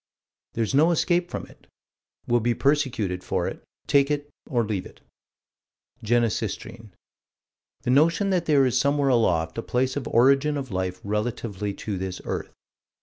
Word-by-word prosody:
There's 115 +1 -1
no 150 +5 +5
escape 175 +1 +1
from - - -5
it. - - -20 0.6
We'll 120 0 +2
be 120 +1 0
persecuted 125 -11 0
for - - -1
it. - - -6 0.2
Take 140 0 +3
it 145 0 -2 0.2
or 120 -3 +1
leave 105 -3 -3
it - - -19 1.0
Genesistrine. 110 -1 -1 0.9
The 125 - 0
notion 165 +8 +3
is - - 0
that 180 -3 +1
there 140 -3 +5
is 125 - 0
somewhere 140 +2 +2
aloft 85 -8 +1
a - - -1
place 130 +2 -1
of 145 -4 -3
origin 140 +5 +3
of 135 -4 -5
life 95 -1 -2
relatively 105 -1 -3
to 100 -4 -4
this 95 -1 -4
earth. - - -4
120 Hz, 155 wpm, -25 LUFS, 105-145 Hz, 1.0 s, no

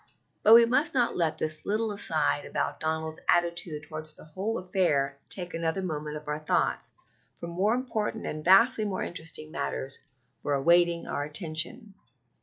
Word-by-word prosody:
But 220 +2 +8
we 235 0 +8
must 260 +5 +1
not 245 -2 +2
let 165 -3 0
this 155 0 -3
little 215 +1 -1
aside 155 -7 0
about - - -3
Donald's 160 0 -2
attitude 170 -3 +1
toward 155 0 -7
the 155 - -4
whole 195 +8 -3
affair 150 -8 0
take 180 -2 -6
another 165 +3 -1
moment 150 -3 -4
of 150 0 -12
our 150 0 -2
thoughts, 155 - 0 0.5
for - - -8
more 185 +7 +1
important 225 -3 -3
and 155 0 -4
vastly 215 - +5
more 200 -3 -2
interesting 155 -2 -4
matters 135 -3 -3 0.4
are 145 - 0
awaiting 170 +4 +3
our 145 - -2
attention. 160 - -2
170 Hz, 160 wpm, -28 LUFS, 155-205 Hz, 0.5 s, But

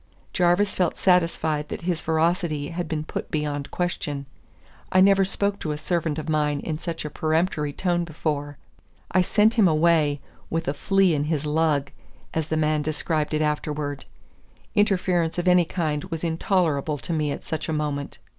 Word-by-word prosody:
Jarvis 185 +2 +3
felt 180 -3 0
satisfied 165 -4 +2
that - - -6
his 175 -2 -1
veracity 160 -2 0
had 170 0 -4
been 155 -1 -2
put - - -5
beyond 145 -2 -2
question. 150 -5 -3 0.7
I 185 - +4
never 195 +1 +6
spoke 200 +1 0
to 155 - -2
a - - -4
servant 160 -1 -1
of 155 0 -5
mine 150 -2 +1
in 155 -2 -4
such 165 -2 -4
a - - -3
peremptory 155 -2 0
tone 175 +2 0
before. 150 -3 -3 0.5
I 185 - +4
sent 210 +4 +3
him 200 - +7
away 155 -2 +3 0.3
"with 165 0 -2
a 140 - +1
flea 195 +3 +2
in 145 -1 0
his 155 -1 -1
lug," 150 -2 +1 0.4
as 160 -1 -1
the 160 - -1
man 155 -1 +2
described 155 0 -1
it 155 - +1
afterwards. 150 -1 -2 0.7
Interference 180 -5 +1
of 175 +1 -1
any 180 -1 +5
kind 155 -2 -2
was 165 -3 -5
intolerable 160 -3 +1
to 170 - -4
me 155 -2 0
at - - -6
such 160 0 -3
a - - 0
moment. 145 -2 -3
160 Hz, 175 wpm, -24 LUFS, 150-175 Hz, 0.7 s, him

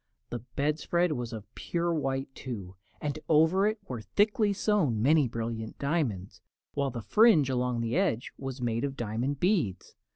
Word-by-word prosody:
The 120 - -3 0.2
bedspread 160 +4 +1
was 120 -5 -3
of 110 -2 -9
pure 170 0 -1
white, 135 -3 -2
too, 100 -10 -7 0.2
and 150 0 -3
over 165 +6 +4
it 215 +1 0
were 125 -4 -5
thickly 205 - +2
sewn 195 - +1
many 145 +4 +4
brilliant 115 -1 -4
diamonds, 140 - -2 0.3
while 140 -1 0
the 120 -3 -6
fringe 195 - +5
along 125 -2 0
the 115 +1 -1
edges 115 +2 0
was 135 -1 -6
made 115 -1 0
of 140 -1 -3
diamond 120 +5 -2
beads. 165 - 0
135 Hz, 160 wpm, -29 LUFS, 115-160 Hz, 0.3 s, fringe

